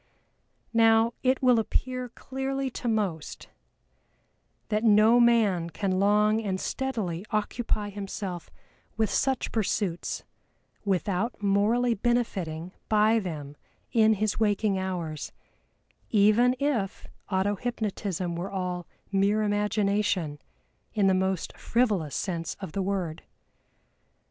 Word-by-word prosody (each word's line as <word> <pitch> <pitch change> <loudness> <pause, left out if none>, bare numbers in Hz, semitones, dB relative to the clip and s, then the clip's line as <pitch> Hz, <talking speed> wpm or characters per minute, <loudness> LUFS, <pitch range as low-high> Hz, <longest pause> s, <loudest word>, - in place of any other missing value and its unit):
Now 225 0 +5
it 260 +1 +1
will 250 -2 +5
appear 250 +3 -2
clearly 270 +2 -3
to 245 - -5
most, 200 -9 -2 1.2
that 215 +1 0
no 220 +2 +6
man 215 -8 +3
can 185 +1 -1
long 210 +2 +3
and 190 -3 -2
steadily 215 -12 -3
occupy 215 0 -1
himself 195 -3 -5 0.5
with 220 -2 +1
such 265 -2 0
pursuits, 200 -5 -1 0.6
without 200 +3 -1
morally 215 +5 +3
benefiting 190 -8 -1 0.2
by 215 +1 +4
them 150 -7 -6 0.4
in 220 -1 +4
his 215 +1 -1
waking 205 -2 +1
hours, 170 -5 -4 0.8
even 220 +4 +4
if 240 -9 -1 0.2
auto 195 +1 +1
hypnotism 200 -6 -3
were 175 +3 -4
all 180 -2 -3 0.2
"mere 200 +2 +2
imagination," 205 -6 0 0.6
in 205 -2 +3
the 190 - +5
most 190 -1 -1
frivolous 210 - 0
sense 170 -4 -3
of 190 -5 -6
the 195 - -2
word. 185 -5 -2
205 Hz, 110 wpm, -27 LUFS, 185-225 Hz, 1.2 s, no